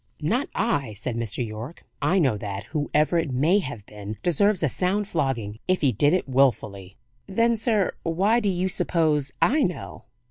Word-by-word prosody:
"Not 240 - 0
I," 145 - 0
said 115 +4 -4
Mr. 115 +1 -2
Yorke. 110 +8 -8 0.2
"I 190 - +2
know 135 - +3
that, 100 -1 -5
whoever 150 - 0
it 165 -3 -2
may 155 +10 +3
have 130 - -6
been 105 0 -8
deserves 185 +2 +3
a - - +4
sound 195 +7 0
flogging, 130 - -2
if 185 0 +1
he 140 -4 +3
did 145 +7 +3
it 180 -3 0
willfully." 105 -8 0 0.3
"Then, 230 +4 +2
sir, 220 -3 +1
why 195 +8 +2
do 210 -4 0
you 185 0 0
suppose 155 -6 0
I 295 +5 +3
know?" 180 -7 -3
150 Hz, 175 wpm, -24 LUFS, 115-190 Hz, 0.3 s, a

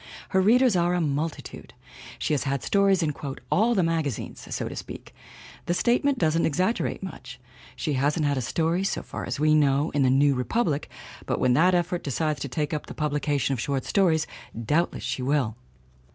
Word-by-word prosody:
Her 190 - +3
readers 240 +3 +4
are 175 0 +2
a - - +1
mul 155 0 0
titude! - - -11 0.4
She - - -1
has 145 - 0
had 135 -1 -1
stories 195 -3 +3
in 150 -2 0 0.4
"all 230 +4 +3
the 190 - +3
magazines," 160 -7 -2
so - - -3
to - - -7
speak; - - -9 0.5
the 175 - +1
statement 255 +6 +2
doesn't 165 -2 +2
exaggerate 185 +7 -1
much. 130 -9 -8 0.4
She 150 - -2
hasn't 145 +4 +1
had 145 0 +1
a 130 - -1
story, 165 +8 0
so 195 - -2
far - - -6
as 125 - -3
we 155 +1 +4
know, 145 0 +3
in 145 - 0
the 130 - +4
New 140 +2 +4
Re 125 -1 -1
public 160 - -1 0.4
but - - -1
when 125 -1 +3
that 180 +7 +4
Effort 175 0 0
decides 150 +1 -1
to 140 - -4
take 150 +4 -2
up 150 - -4
the - - -8
pub 150 -2 -1
lication 145 -2 0
of 130 - -1
short 135 +2 -2
stories 165 -6 +2 0.4
doubtless 160 +8 0
she - - -3
will! 130 -4 0
155 Hz, 200 wpm, -26 LUFS, 140-180 Hz, 0.5 s, readers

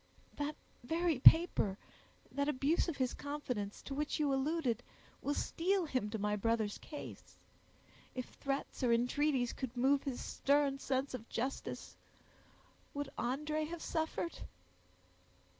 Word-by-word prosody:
"That 290 +1 -2 0.3
very 325 +2 +1
paper, 265 - +7 0.5
that 280 +1 0
abuse 295 +5 +2
of 315 - -3
his 255 -2 +1
confidence, 250 -8 -4
to 275 - -5
which 300 +2 -1
you 290 -2 +2
alluded, 270 -2 +1 0.4
will 290 - 0
steel 370 +2 +1
him 255 -8 -1
to 220 - -2
my 210 0 0
brother's 220 0 0
case. 295 - -9 0.8
If 255 -1 -2
threats 275 0 -4
or 245 -2 +3
entreaties 250 +2 +2
could 255 -2 -5
move 270 +3 +4
his 265 -3 -3
stern 280 -1 +2
sense 265 0 -1
of 240 -2 -6
justice, 260 +4 -3 1.0
would 285 -1 -3
André 300 +5 -1
have 340 0 -6
suffered?" 320 +1 -2
275 Hz, 130 wpm, -35 LUFS, 245-300 Hz, 1.0 s, paper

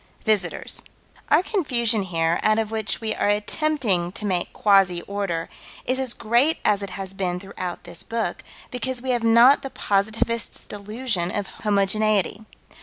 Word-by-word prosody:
Visitors. 205 -6 0 0.5
Our - - +5
confusion 240 - +1
here, 165 -2 0
out 215 0 +3
of 220 -1 -1
which 220 0 -1
we 220 -1 -1
are - - 0
attempting 210 - +1
to 205 +1 -4
make 180 -3 -1
quasi 195 -4 +3
order, 195 -5 -3 0.4
is 255 +1 +1
as 260 -3 -2
great 240 +8 +2
as 205 -1 +3
it 200 - -5
has 195 -1 -6
been 180 -2 -2
throughout 185 -2 -6
this 175 -1 -3
book, 230 0 -3 0.3
because 255 0 -2
we 260 +1 -2
have 240 -1 +1
not 235 +4 +6
the 270 - -5
positivist's 220 +2 -1
delusion 210 -2 -3
of 205 +1 -2
homogeneity. 210 +1 +1
210 Hz, 155 wpm, -23 LUFS, 195-235 Hz, 0.5 s, not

